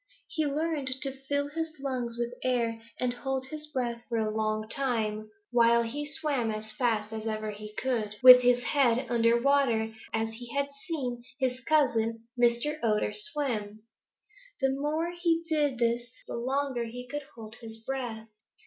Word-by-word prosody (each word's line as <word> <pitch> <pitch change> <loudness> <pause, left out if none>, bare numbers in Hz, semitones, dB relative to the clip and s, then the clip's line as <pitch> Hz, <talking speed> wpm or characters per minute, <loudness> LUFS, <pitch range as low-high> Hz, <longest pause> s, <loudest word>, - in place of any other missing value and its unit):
He 310 -2 0
learned 300 -1 -1
to 275 - 0
fill 285 +2 -2
his 320 +1 -4
lungs 250 -4 -3
with 240 0 -2
air 235 -3 0 0.2
and 250 -1 +1
hold 265 +1 -2
his 305 +2 -6
breath 245 -5 -2
for 230 - 0
a 215 -1 -1
long 215 0 -1
time, 220 -5 -1 0.2
while 235 -1 +5
he 290 +6 -4
swam 285 -6 0
as 215 0 -3
fast 220 -2 0
as 220 0 -4
ever 215 -1 -2
he 210 0 -9
could 225 -5 -1
with 250 -1 +12
his 245 0 +3
head 255 -3 +2
under 235 0 +4
water 240 -5 +2 0.2
as 225 0 -1
he 240 +2 -8
had 280 0 +1 0.2
seen 250 -8 -3
his 255 -2 0
cousin, 235 -6 +1
Mr. 240 +5 +2
Otter, 210 -2 +1
swim. 215 -3 0 0.8
The 270 -1 +2
more 300 +5 -1
he 340 -1 +1
did 295 -5 +1
this, 235 0 0 0.2
the - - -6
longer 260 0 -1
he 250 +2 -8
could 290 +2 -5
hold 220 0 -10
his 225 -1 -8
breath. 225 -2 -5
245 Hz, 165 wpm, -29 LUFS, 225-280 Hz, 0.8 s, with